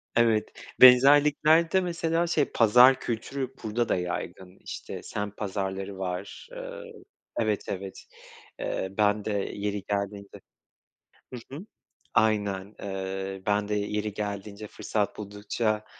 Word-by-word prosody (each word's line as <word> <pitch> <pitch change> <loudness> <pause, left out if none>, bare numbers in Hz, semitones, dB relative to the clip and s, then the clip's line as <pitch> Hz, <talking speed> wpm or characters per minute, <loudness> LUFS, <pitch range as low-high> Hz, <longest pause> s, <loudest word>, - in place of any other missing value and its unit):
Evet, 115 -2 +3 0.3
benzerlikler 145 +5 +7
de 190 - +3
mesela 170 -1 0
şey, 150 -4 +2
pazar 125 +4 +6
kültürü 130 +3 -4
burada 110 +2 -1
da - - +3
yaygın. 90 +1 -5
İşte, - - -7
semt 105 0 -5
pazarları 95 -1 -4
var, 95 - -5
ııı - - -8 0.6
Evet, 110 -3 0
evet, 95 0 -6 0.6
ııı, 95 +1 -3
ben 105 0 +2
de 110 - -1 0.2
yeri 100 -1 -3
geldiğinde 100 0 -4 0.9
hı 125 - -5 0.2
hı, 170 +7 -8 0.5
aynen. 105 -2 +1
Iıı, 95 0 -4
ben 105 0 +1
de 105 - -1
yeri 105 0 -2
geldiğince, 105 0 -5
fırsat 105 0 -2
buldukça, 105 +1 -2
105 Hz, 120 wpm, -27 LUFS, 100-125 Hz, 0.9 s, benzerlikler